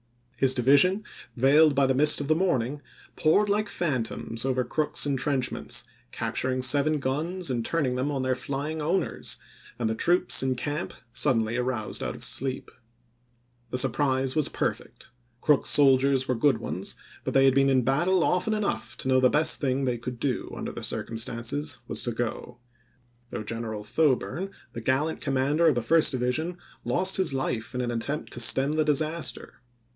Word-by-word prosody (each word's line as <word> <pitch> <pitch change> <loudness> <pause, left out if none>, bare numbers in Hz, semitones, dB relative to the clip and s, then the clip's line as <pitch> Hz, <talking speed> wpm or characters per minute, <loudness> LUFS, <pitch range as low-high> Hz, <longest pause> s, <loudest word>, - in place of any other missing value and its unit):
His 130 +1 +5
division, 145 - +4 0.3
veiled 145 +4 +5
by 140 0 +3
the 130 - +2
mist 150 +3 +5
of 145 - -4
the 155 - +4
morning, 145 -6 -1 0.3
poured 180 +7 +3
like 205 +1 0
phantoms 120 -6 -2
over 130 -1 0
Crook's 150 +3 0
in 140 -1 0
trenchments, 130 -2 -2 0.3
capturing 130 0 -2
seven 145 +4 +3
guns 155 +5 -2
and 120 -2 -1
turning 135 -3 -1
them 130 +3 -1
on 135 -3 -2
their 130 0 +1
flying 140 +4 -4
owners, 170 +6 -1 0.4
and 120 - -1
the 110 - 0
troops 175 +10 +3
in 130 -1 0
camp 145 +5 -4 0.2
suddenly 115 -6 +1
aroused 125 -3 -2
out - - -3
of - - -8
sleep. 135 0 -1 1.0
The 125 - -3
surprise 130 0 +1
was 155 -2 +1
perfect; - - -4
x - - -19 0.3
Crook's 150 -3 +2
soldiers 135 -1 +3
were - - +1
good 135 +4 +2
ones, - - -5 0.3
but - - -4
they 135 0 +5
had 135 - +5
been 135 0 +3
in 130 -2 +3
battle 170 +8 +2
often 200 +4 +1
enough 210 -1 -3
to - - -5
know 130 0 +4
the 130 0 +4
best 155 +3 +2
thing 135 -1 0
they 120 -2 -1
could 120 0 -6
do, 130 -1 -2
under - - -5
the - - -8
circumstances, 115 +5 -2
was - - -2
to 120 - -1
go; 120 +1 -4 0.7
though 110 - -5
General 110 -1 -5
Thoburn, 155 - 0 0.2
the 115 - -6
gallant 135 +7 -1
commander 140 +4 +1
of 150 - +4
the 120 - -1
first 160 +6 +4
division, 140 +7 -2 0.3
lost 185 +11 +1
his 185 -8 +1
life 125 -2 -3
in 125 - -1
an 120 -1 -2
attempt 130 +6 -4
to - - -5
stem 135 +4 +5
the 155 0 +1
disaster. 155 -1 -2
135 Hz, 175 wpm, -26 LUFS, 125-155 Hz, 1.0 s, His